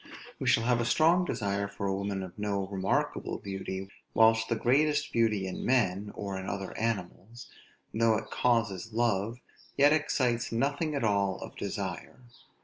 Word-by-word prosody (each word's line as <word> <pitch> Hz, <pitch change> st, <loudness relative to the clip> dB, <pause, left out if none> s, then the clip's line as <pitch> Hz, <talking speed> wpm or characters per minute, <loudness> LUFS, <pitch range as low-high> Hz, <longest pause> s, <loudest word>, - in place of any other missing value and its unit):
We -, -, -3 dB
shall 115 Hz, -, +4 dB
have 120 Hz, 0 st, +2 dB
a -, -, -1 dB
strong 165 Hz, +8 st, +4 dB
desire 100 Hz, -, -1 dB
for 100 Hz, 0 st, -6 dB
a 95 Hz, -, +1 dB
woman 100 Hz, 0 st, -2 dB
of 90 Hz, -2 st, -8 dB
no 100 Hz, -2 st, -1 dB
remarkable 95 Hz, -1 st, -1 dB
beauty; 95 Hz, -1 st, -5 dB, 0.3 s
whilst 115 Hz, 0 st, +5 dB
the 115 Hz, -, +2 dB
greatest 145 Hz, +6 st, +2 dB
beauty 110 Hz, -4 st, +2 dB
in 95 Hz, -, -5 dB
men, 105 Hz, -5 st, +1 dB
or 100 Hz, -2 st, -4 dB
in 95 Hz, -, -6 dB
other 95 Hz, -1 st, -5 dB
animals, 110 Hz, +1 st, -4 dB, 0.4 s
though 115 Hz, 0 st, +3 dB
it -, -, -7 dB
causes 115 Hz, -4 st, 0 dB
love, 115 Hz, -1 st, 0 dB, 0.4 s
yet 145 Hz, +2 st, +6 dB
excites 125 Hz, -6 st, 0 dB
nothing 145 Hz, +6 st, 0 dB
at 140 Hz, -, -1 dB
all 100 Hz, -3 st, +1 dB
of -, -, -10 dB
desire. -, -, -5 dB
110 Hz, 160 wpm, -29 LUFS, 100-120 Hz, 0.4 s, yet